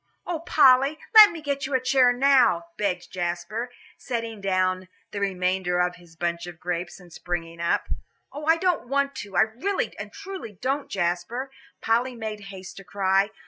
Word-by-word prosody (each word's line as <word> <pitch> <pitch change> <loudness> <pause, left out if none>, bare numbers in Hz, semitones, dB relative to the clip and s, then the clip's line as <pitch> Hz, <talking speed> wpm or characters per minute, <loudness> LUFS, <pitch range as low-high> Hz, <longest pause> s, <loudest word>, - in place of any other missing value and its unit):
"Oh, 345 -2 -3
Polly, 275 -2 +4 0.2
let 430 -2 +11
me 330 -4 -8
get 280 -2 -2
you 275 - -1
a - - +4
chair 255 0 +4
now," 250 -9 +4
begged 185 -3 -2
Jasper, 175 +7 -3 0.3
setting 230 -4 -4
down 185 -1 0 0.2
the 205 - -4
remainder 185 -2 0
of 180 0 0
his 170 -1 -18
bunch 170 +1 -3
of 175 -2 -10
grapes, 175 0 -4
and 175 -2 -16
springing 170 -1 -5
up. 170 - 0 0.5
"Oh, 295 +2 -6
I 325 +1 +4
don't 350 -7 0
want 280 +1 0
to, 200 -2 -7
I - - +7
really 255 - -1
and - - -7
truly 390 - -8
don't, 275 +2 -2
Jasper," 180 +9 -2 0.3
Polly 240 +3 +1
made 215 -3 -6
haste 190 -1 -10
to 195 - -9
cry. 195 +1 +1
210 Hz, 175 wpm, -25 LUFS, 180-270 Hz, 0.5 s, let